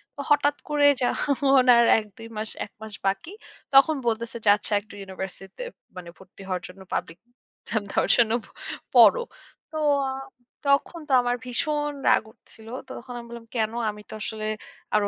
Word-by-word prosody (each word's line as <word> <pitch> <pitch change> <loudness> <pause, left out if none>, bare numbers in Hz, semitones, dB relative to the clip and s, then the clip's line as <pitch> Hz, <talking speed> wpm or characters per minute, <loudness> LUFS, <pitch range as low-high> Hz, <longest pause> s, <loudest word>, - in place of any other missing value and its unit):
তো 285 - -5
হঠাৎ 290 0 +4
করে 295 -1 +3 0.2
যখন 270 0 +3
আর 235 - +6
১ 215 - -8
২ 225 0 -9
মাস, 215 0 -3 0.2
১ - - -19
মাস 220 -1 -8
বাকি 195 - -1 0.4
তখন 300 +3 +7
বলতেছে 230 +1 -1
যে - - +6
আচ্ছা 210 0 -4
একটা 205 - -17
ইউনিভার্সিটিতে 190 - -7 0.3
মানে 170 -1 -8
ভর্তি 190 +1 -16
হওয়ার 185 -1 -2
জন্য 190 +1 -13
পাবলিক 165 +2 -3 0.4
এক্সাম 220 -1 -2
দেওয়ার - - +1
জন্য 230 -2 +4 0.6
পড়ো। - - +7 0.5
তো 315 - -5 0.3
আ - - -2 0.5
তখন 280 +4 +2
তো - - +1
আমার 245 0 0
ভীষণ 295 +4 -1 0.2
রাগ - - +4
উঠছিল। 220 0 -16 0.2
তো - - -10
তখন 245 0 -10
আমি 235 - -10
বললাম 235 -1 -10
কেন 220 -1 +1 0.2
আমি 210 0 -12
তো - - -9
আসলে 215 0 -4 0.5
আরো 205 -1 +3
230 Hz, 170 wpm, -25 LUFS, 205-280 Hz, 0.6 s, তখন